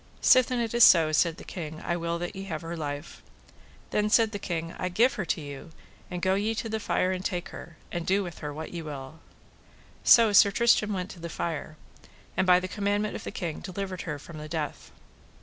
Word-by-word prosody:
Sithen 255 -1 +4
it 230 -1 -2
is 235 0 +6
so, 165 -6 +7
said 165 +1 +2
the - - -10
king, 155 -3 -7
I 170 - 0
will 170 0 -2
that 175 +3 -5
ye 195 0 -6
have 160 -4 -5
her 165 +1 -5
life. 145 -1 -6 0.7
Then, 210 0 +1
said 225 0 +4
the 205 - -5
king, 165 -3 -4
I 180 - -1
give 230 +8 +3
her 190 - -3
to - - -1
you, 145 +2 -8 0.4
and 180 -1 -5
go 190 - +3
ye 210 +3 0
to 225 - -3
the 220 0 -2
fire 185 -3 0
and 185 0 -3
take 180 -1 -3
her, 160 -4 -11
and 175 -1 -3
do 195 +3 +1
with 175 -2 -8
her 150 -1 -5
what 155 +3 -7
ye 170 - -4
will. 145 0 -8 0.8
So 225 -3 +7
Sir 200 0 +7
Tristram 215 0 +3
went 185 0 -4
to 175 - -12
the 170 0 -6
fire, 155 -2 -4 0.6
and 185 - +1
by 180 0 +7
the 185 - -4
commandment 205 +1 -1
of - - -6
the - - -3
king 170 -4 -4
delivered 185 0 -5
her 150 -4 -4
from 155 +2 -10
the 155 0 -8
death. 155 -2 -4
180 Hz, 225 wpm, -27 LUFS, 160-205 Hz, 0.8 s, so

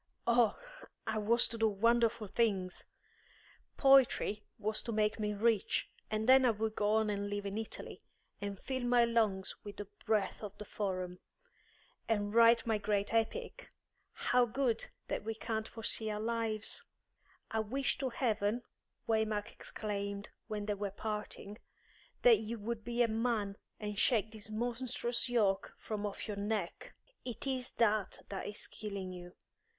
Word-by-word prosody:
Oh, 235 -3 +4 0.5
I 220 -1 0
was 230 +3 +4
to 230 - -5
do 225 - +5
wonderful 230 +2 +3
things! 195 -3 0 0.9
Poetry 265 -6 +5
was 215 0 -1
to 235 - -4
make 215 0 +1
me 210 -1 0
rich, 220 -1 +1 0.2
and 215 +1 -1
then 260 +1 +8
I 250 - +5
would 220 0 0
go 210 +1 +3
and 205 -2 0
live 205 0 -3
in 200 0 -3
Italy, 220 0 -5 0.4
and 200 -1 -3
fill 260 -1 -3
my 245 -1 +4
lungs 220 -5 +1
with 205 -1 -8
the 205 - -4 0.2
breath 210 -3 +1
of 205 -1 -7
the 210 - -7
Forum, 185 -3 -3 0.9
and 205 -2 +1
write 230 0 +6
my 220 -2 +1
great 205 0 0
Epic. 230 - -1 0.4
How 250 0 +3
good 235 -1 0 0.2
that - - -2
we 225 +1 -3
can't 220 0 -2
foresee 225 -1 -1
our 210 0 -2
lives!" 225 -1 0 0.7
"I 225 - +1
wish 255 +6 0
to 265 - 0
heaven," 225 -1 0 0.4
Waymark 220 -1 +1
exclaimed, 200 -1 -4 0.2
when 210 -2 -3
they 210 - 0
were 200 0 -2
parting, 210 +1 -5 0.6
"that 230 -4 +8
you 225 +2 -4
would 220 +1 -4
be 240 +1 +1
a - - +3
man 220 -3 0 0.2
and 210 -1 -3
shake 220 -4 +3
this 215 -1 -10
monstrous 240 +2 -1
yoke 205 -5 +2
from 210 -1 -3
off 200 - -6
your 210 -2 -4
neck! 205 -3 -3 0.3
It 245 0 -5
is 260 -2 -1
that 215 -4 +1
that 195 - -4
is 205 - -3
killing 200 -3 -5
you. 175 0 -9
215 Hz, 155 wpm, -34 LUFS, 205-230 Hz, 0.9 s, then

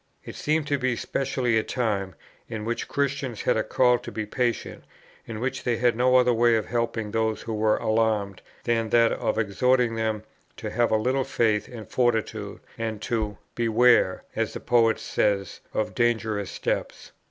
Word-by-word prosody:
It - - -7
seemed 155 0 0
to 145 -1 0
be 130 -1 0
specially 125 -2 0
a - - -2
time, 100 - -2 0.3
in 110 -2 -5
which 120 +1 -2
Christians 140 -4 -2
had - - +2
a 110 - +1
call 125 +1 +3
to - - -8
be 110 - -3
patient, 120 +2 -2 0.4
in 110 -2 -5
which 130 +3 -3
they 120 -2 0
had 120 -1 +2
no 125 +2 +3
other 125 -1 +5
way 120 0 +4
of 110 - 0
helping 115 -3 -2
those 110 -1 -1
who 115 - -4
were 110 0 +2
alarmed, 110 -3 0 0.2
than 115 -2 0
that 115 0 +4
of - - -1
exhorting 120 +3 +2
them 110 -1 -2 0.3
to - - -5
have 120 0 +2
a 110 - +3
little 130 +5 +1
faith 110 -4 +1
and 110 -5 -9
fortitude, 110 -4 -1 0.2
and 110 -2 -3
to 110 -5 -2 0.2
"beware," 115 -4 +3
as - - -1
the - - -5
poet 115 -2 +3
says, 100 -3 -1
"of 110 - -2
dangerous 110 -4 0
steps." - - -3
115 Hz, 175 wpm, -25 LUFS, 110-125 Hz, 0.4 s, other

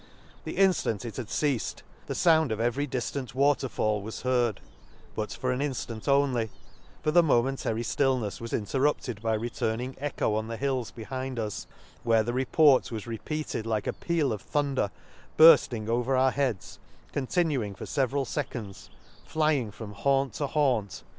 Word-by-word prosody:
— - - -26
The - - -5
inftant 175 - +2
it 115 - -6
had 125 -5 -4
ceafed 140 -3 -1 0.2
the - - -3
found 160 -4 +4
pf 110 -1 -2
every 120 +5 0
diftant 130 0 -4
water 140 -1 +2
fall 105 -1 0
was 110 +3 -7
heard, 120 -5 +1 0.5
but 105 - -3
for 130 - -2
an 125 - -1
inftant 130 -5 -4
only; 135 -5 +2 0.5
for 155 - +2
the 175 +2 +7
momentary 125 -5 +1
flillnefs 125 -4 0
was 115 - -6
interrupted 125 -1 0
by 110 -1 +1
returning 120 +2 -2
echo 145 -6 -1
on 110 +1 -1
the 115 0 -5
hills 130 -3 -1
behind 130 +3 -5
us; 105 -3 -4 0.3
where 115 -2 +3
the 120 +2 -2
report 130 +2 +4
was 110 -3 -5
repeated 120 +1 -4
like 110 -2 -1
a - - -1
peal 160 -8 0
of 105 - -5
thunder 140 -7 0 0.5
burft 160 -6 +8
ing 110 -3 -4
over 120 +3 +1
our 130 0 +4
heads, 125 -8 -2 0.3
continuing 135 - 0
for - - -7
feve 135 - +1
f - - -14
al 140 -1 +1
feconds, 120 -10 -5 0.3
flying 150 -7 +1
from 105 0 -9
haunt 135 +3 +1
to 145 - -2
haunt, 130 -9 +1
till 95 - -9
the - - -6
Lakes. - - -16
125 Hz, 180 wpm, -28 LUFS, 110-140 Hz, 0.5 s, burft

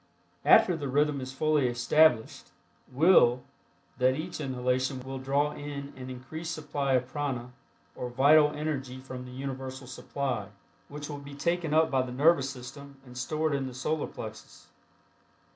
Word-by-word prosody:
After 180 - +6
the 145 -3 -4
rhythm 145 +1 +1
is 130 0 -6
fully 150 0 +2
established 120 +1 +2 0.4
will 130 -4 +5 0.6
that 130 +1 +4
each 160 +2 -5
inhalation 130 0 -1
will 135 +1 -6
draw 140 +3 +1
in 145 -1 -7
an 130 0 -8
increased 160 +6 -6
supply 145 -3 -2
of 125 -1 +2
prana 130 -4 -3 0.4
or 125 - -5
vital 145 +5 +6
energy 145 -4 -4
from 130 -1 -8
the 125 - -10
Universal 130 0 -6
supply, 125 -3 -3 0.4
which 145 0 -7
will 145 -2 -6
be 140 0 -10
taken 170 +2 -1
up 160 +1 +3
by 135 -1 +3
the 130 -1 -4
nervous 140 +1 +3
system 135 +2 -10
and 125 -1 -13
stored 155 +4 -1
in 135 -1 -1
the 125 - -8
Solar 155 +4 -1
Plexus. - - -10
135 Hz, 155 wpm, -29 LUFS, 130-150 Hz, 0.6 s, After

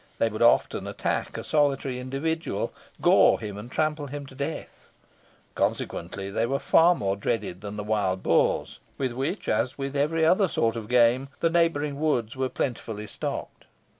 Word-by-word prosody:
They 115 - +2
would 110 +1 -6
often 120 - +3
attack - - -2
a - - -5
solitary 140 -4 +1
individual, 145 +6 -2 0.3
gore - - +6
him, 105 -3 -6
and 105 +4 -8
trample 155 -1 -1
him 145 +1 -6
to 135 - -13
death. 140 +4 -6 0.6
Consequently, 95 +3 -2
they 115 +3 0
were 135 +2 0
far 170 +5 +5
more 100 -6 -1
dreaded 100 -3 -2
than 105 0 -6
the 105 - -3
wild 100 -3 0
boars, - - +1 0.2
with 130 -2 -1
which, 135 - -3
as 125 +4 0
with 135 0 -4
every 160 +3 +2
other 185 +4 +4
sort 115 -8 0
of 110 -2 -5
game, 125 +2 +4
the 165 - +2
neighbouring 150 -4 +1
woods 125 -8 0
were 130 0 -1
plentifully 115 -5 -3
stocked. 100 - -6
130 Hz, 165 wpm, -26 LUFS, 110-150 Hz, 0.6 s, gore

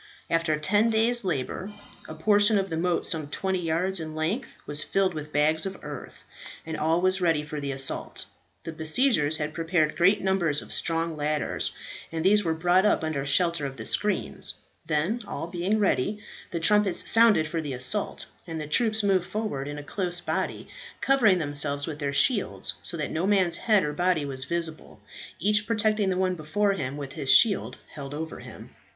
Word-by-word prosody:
After 165 -2 +1
ten 205 +8 +3
days' 230 +2 +2
labour, 185 +4 -3 0.3
a 155 - -8
portion 205 +5 +4
of 195 -2 -1
the - - -1
moat 175 +1 0
some 155 -3 -1
twenty 190 +5 -2
yards 175 +3 0
in 155 -1 -6
length 170 +12 -3
was 145 0 -1
filled 195 -2 +1
with 150 -1 -7
bags 155 +2 +2
of 195 - -6
earth, 145 -2 -9 0.4
and 160 -1 -4
all 160 +2 +1
was 185 +1 +2
ready 165 -4 +2
for 150 -1 -6
the 140 -1 -3
assault. 135 0 -2 0.4
The 165 - -5
besiegers 160 - +1
had 150 0 -3
prepared 165 -2 0
great 195 +4 +4
numbers 175 -6 +1
of - - -5
strong 165 -1 -1
ladders, 150 0 -1 0.4
and 165 +1 -3
these 205 +2 +5
were 165 -2 0
brought 175 +3 +3
up 210 - +2
under 155 -3 -2
shelter 170 +2 +2
of 135 -1 -9
the 110 - -7
screens. - - -2 0.3
Then, 170 +11 0
all - - -4
being 180 +5 -1
ready, 205 0 +1 0.3
the 170 - -3
trumpets 205 +2 +3
sounded 225 -9 +5
for 165 +1 -3
the 145 -3 -5
assault, 130 +12 -1 0.2
and 165 -1 -5
the 155 - -4
troops 215 +7 +2
moved 190 -3 +2
forward 210 -11 -3
in 145 0 -6
a 145 - -7
close 175 +2 -3
body, - - -3 0.3
covering 240 -8 +4
themselves 145 -2 0
with 155 -2 -6
their 140 -2 -1
shields 205 - +1
so 170 - -4
that 150 - -3
no 170 +4 -1
man's 190 -4 +3
head 215 -5 +3
or 150 0 -2
body 175 -2 +1
was 130 -2 0
visible, 165 0 -4 0.4
each 210 +1 +2
protecting 215 -3 +1
the 185 - 0
one 185 0 +1
before 190 +5 0
him 140 -6 -4
with 140 -2 -7
his 135 - -3
shield 215 -5 +4 0.2
held 140 -1 -7
over 160 +1 -6
him. - - -11
165 Hz, 190 wpm, -26 LUFS, 150-195 Hz, 0.4 s, these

